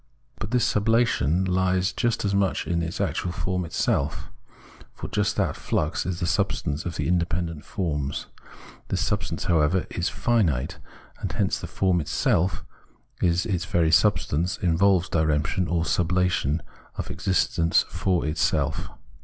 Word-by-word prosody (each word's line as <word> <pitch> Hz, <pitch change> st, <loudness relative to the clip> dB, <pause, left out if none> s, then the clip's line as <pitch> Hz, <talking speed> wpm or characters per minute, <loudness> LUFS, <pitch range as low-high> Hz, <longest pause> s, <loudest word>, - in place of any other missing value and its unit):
But -, -, -4 dB
this 125 Hz, -1 st, +2 dB
sublation 105 Hz, -, +2 dB
lies 95 Hz, 0 st, +1 dB
just 120 Hz, -2 st, 0 dB
as 100 Hz, -, 0 dB
much 100 Hz, -1 st, +1 dB
in 85 Hz, +2 st, 0 dB
the 85 Hz, 0 st, -2 dB
actual 90 Hz, -, -3 dB
form 90 Hz, 0 st, -2 dB
itself. 75 Hz, -2 st, -1 dB, 0.6 s
For -, -, -6 dB
just 105 Hz, -1 st, 0 dB
that -, -, 0 dB
flux 75 Hz, +4 st, -1 dB
is 90 Hz, -2 st, -2 dB
the 85 Hz, -, -1 dB
substance 75 Hz, -2 st, -1 dB
of 85 Hz, -, -4 dB
the -, -, -2 dB
independent 85 Hz, -2 st, -1 dB
forms. 75 Hz, -6 st, -2 dB, 0.6 s
This -, -, 0 dB
substance, -, -, -2 dB
however, 85 Hz, +2 st, +2 dB
is 90 Hz, -, -1 dB
infinite, 90 Hz, -, 0 dB, 0.4 s
and -, -, -3 dB
hence -, -, 0 dB
the -, -, -6 dB
form 95 Hz, -3 st, +1 dB
itself 85 Hz, +4 st, 0 dB, 0.6 s
in 90 Hz, -, +4 dB
its 90 Hz, +1 st, 0 dB
very 85 Hz, -2 st, +2 dB
subsistence 85 Hz, +2 st, +2 dB
involves 90 Hz, +1 st, +3 dB
diremption, 80 Hz, +2 st, +1 dB
or 85 Hz, -1 st, +1 dB
sublation 90 Hz, -2 st, +1 dB, 0.3 s
of -, -, -4 dB
its 75 Hz, -, -8 dB
existence 90 Hz, -3 st, +2 dB
for 90 Hz, -5 st, 0 dB
itself. 75 Hz, +1 st, 0 dB
90 Hz, 145 wpm, -25 LUFS, 80-95 Hz, 0.6 s, in